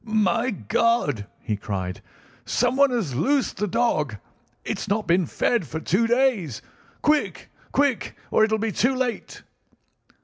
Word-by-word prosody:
"My 220 Hz, +2 st, +1 dB
God!" 150 Hz, -, 0 dB, 0.2 s
he 110 Hz, -, -1 dB
cried. 95 Hz, -3 st, -4 dB, 0.4 s
"Someone 280 Hz, +2 st, +2 dB
has 225 Hz, -, -1 dB
loosed 270 Hz, -, +1 dB
the 210 Hz, +2 st, -1 dB
dog. 165 Hz, -, 0 dB, 0.5 s
It's -, -, -3 dB
not 210 Hz, +2 st, 0 dB
been 175 Hz, -1 st, +2 dB
fed 235 Hz, -10 st, 0 dB
for 160 Hz, -, -4 dB
two 195 Hz, +8 st, +1 dB
days. 235 Hz, -, +1 dB, 0.4 s
Quick, 300 Hz, 0 st, +1 dB, 0.2 s
quick, 280 Hz, -4 st, 0 dB
or -, -, +4 dB
it'll 220 Hz, 0 st, +2 dB
be 220 Hz, 0 st, -1 dB
too 250 Hz, +6 st, +1 dB
late!" 255 Hz, -2 st, -3 dB
220 Hz, 135 wpm, -24 LUFS, 155-245 Hz, 0.5 s, or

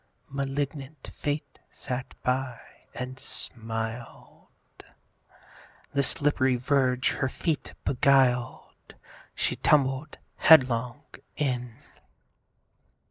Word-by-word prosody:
(Malignant 140 Hz, +1 st, -4 dB
Fate 145 Hz, -1 st, -3 dB
sat 130 Hz, -1 st, -5 dB
by, 125 Hz, -1 st, 0 dB, 0.4 s
and 130 Hz, +1 st, -6 dB
smiled.) 115 Hz, -2 st, -5 dB, 1.5 s
The 140 Hz, -, +3 dB
slipp'ry 140 Hz, -2 st, +2 dB
verge 125 Hz, -1 st, +2 dB
her 130 Hz, -, -1 dB
feet 155 Hz, +2 st, -3 dB
beguiled, 130 Hz, -2 st, +1 dB, 0.4 s
She -, -, -1 dB
tumbled 140 Hz, 0 st, +2 dB, 0.2 s
headlong 130 Hz, -3 st, +5 dB, 0.3 s
in. 125 Hz, -5 st, -2 dB
130 Hz, 75 wpm, -27 LUFS, 125-140 Hz, 1.5 s, headlong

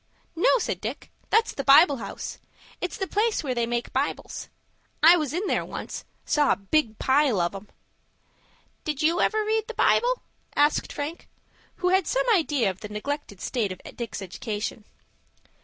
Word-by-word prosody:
"No," 335 Hz, -, +3 dB
said -, -, -2 dB
Dick; -, -, -6 dB, 0.2 s
"that's 450 Hz, 0 st, +3 dB
the 275 Hz, -, -4 dB
Bible 280 Hz, +2 st, +7 dB
House. 200 Hz, -4 st, -6 dB, 0.4 s
It's 360 Hz, -, -3 dB
the 385 Hz, -, -1 dB
place 425 Hz, 0 st, 0 dB
where 265 Hz, -3 st, -1 dB
they 235 Hz, -1 st, 0 dB
make 240 Hz, 0 st, -2 dB
Bibles. -, -, -3 dB, 0.5 s
I 335 Hz, +3 st, +9 dB
was 305 Hz, -6 st, -1 dB
in 355 Hz, +6 st, -2 dB
there -, -, +1 dB
once,—saw 295 Hz, -2 st, -2 dB
a -, -, +4 dB
big 220 Hz, +2 st, 0 dB
pile 265 Hz, -5 st, +3 dB
of 175 Hz, +1 st, 0 dB
'em." 195 Hz, +1 st, -8 dB, 1.2 s
"Did 305 Hz, -1 st, -2 dB
you 330 Hz, +3 st, +3 dB
ever 435 Hz, -1 st, +2 dB
read 440 Hz, 0 st, 0 dB
the -, -, -7 dB
Bible?" -, -, +3 dB, 0.3 s
asked 295 Hz, +1 st, +2 dB
Frank, 295 Hz, +4 st, -5 dB, 0.5 s
who 360 Hz, -, 0 dB
had 375 Hz, -1 st, +3 dB
some -, -, +1 dB
idea 295 Hz, -, +2 dB
of 185 Hz, -, -13 dB
the 210 Hz, -, -8 dB
neglected 210 Hz, -1 st, -5 dB
state 225 Hz, -7 st, -1 dB
of 185 Hz, -, -7 dB, 0.2 s
Dick's 230 Hz, -4 st, -5 dB
education. 210 Hz, +3 st, -5 dB
290 Hz, 165 wpm, -26 LUFS, 220-355 Hz, 1.2 s, I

